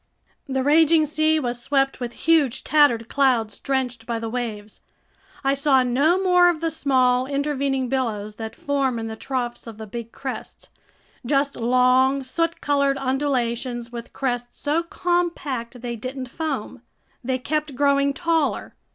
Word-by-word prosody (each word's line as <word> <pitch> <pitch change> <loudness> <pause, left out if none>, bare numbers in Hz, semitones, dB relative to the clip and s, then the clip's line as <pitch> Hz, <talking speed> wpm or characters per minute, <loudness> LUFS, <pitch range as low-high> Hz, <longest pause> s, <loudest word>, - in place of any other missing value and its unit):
The 265 -1 0
raging 315 +2 +5
sea 310 +1 +2
was 240 -3 -3
swept 270 +1 +1
with 240 -1 -4
huge 305 -6 +3
tattered 275 -7 +3
clouds 245 -6 +1
drenched 250 -4 -2
by 235 -1 -1
the 225 0 -4
waves. 220 -4 -5 0.6
I 270 0 +3
saw 275 -2 +3
no 280 +9 +2
more 360 -2 +5
of 340 -3 -1
the 330 0 -1
small 255 -4 +2
intervening 275 -2 -1
billows 215 -5 -2
that 220 -1 -6
form 275 -3 0
in 225 - -4
the 220 0 -5
troughs 245 -1 -4
of 225 -2 -9
the 220 - -7
big 230 +2 -7
crests. - - -7 0.5
Just 275 +2 +1
long, 255 +3 +3
soot 330 +6 -2
colored 280 -1 +2
undulations 255 -3 -1
with 235 -1 -8
crests 245 -2 -3
so 305 +3 +1
compact 335 -9 -2
they 240 -1 -3
didn't 255 +2 -6
foam. 275 -7 -4 0.4
They 255 +1 0
kept 300 +2 -2
growing 280 +1 +3
taller. 330 -1 0
265 Hz, 150 wpm, -23 LUFS, 240-290 Hz, 0.6 s, raging